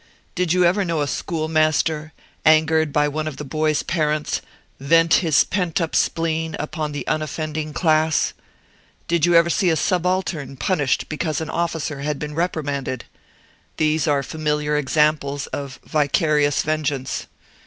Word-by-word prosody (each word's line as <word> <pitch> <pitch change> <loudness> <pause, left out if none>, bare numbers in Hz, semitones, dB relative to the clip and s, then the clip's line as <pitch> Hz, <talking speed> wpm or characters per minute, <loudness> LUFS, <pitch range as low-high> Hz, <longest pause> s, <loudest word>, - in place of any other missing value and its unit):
Did 180 -2 0
you 180 0 +4
ever 190 +4 +3
know 165 -4 -1
a 145 - 0
schoolmaster, 155 0 0 0.3
angered 155 0 +4
by 150 +1 +2
one 155 +1 -3
of 150 -3 -5
the 150 - -5
boy's 155 +2 0
parents, 155 -3 -1 0.4
vent 165 +4 +4
his 160 -5 +4
pent 180 -4 -1
up 165 -2 -2
spleen 160 -1 0
upon 155 0 -3
the 145 - -5
unoffending 155 0 -3
class? 155 -1 +2 0.7
Did 170 -1 +2
you 175 - +3
ever 170 0 +5
see 185 0 +2
a 165 - +3
subaltern 175 -5 -1
punished 145 0 0
because 155 0 -2
an 160 -1 -4
officer 160 -4 -2
had 150 +1 -2
been 150 +1 -5
reprimanded? 145 -6 -2 0.7
These 155 -1 +1
are 140 -2 +2
familiar 150 0 -1
examples 150 -1 +1
of 140 -2 -5
vicarious 150 -1 +2
vengeance. 145 -4 -2
155 Hz, 145 wpm, -21 LUFS, 150-165 Hz, 0.7 s, ever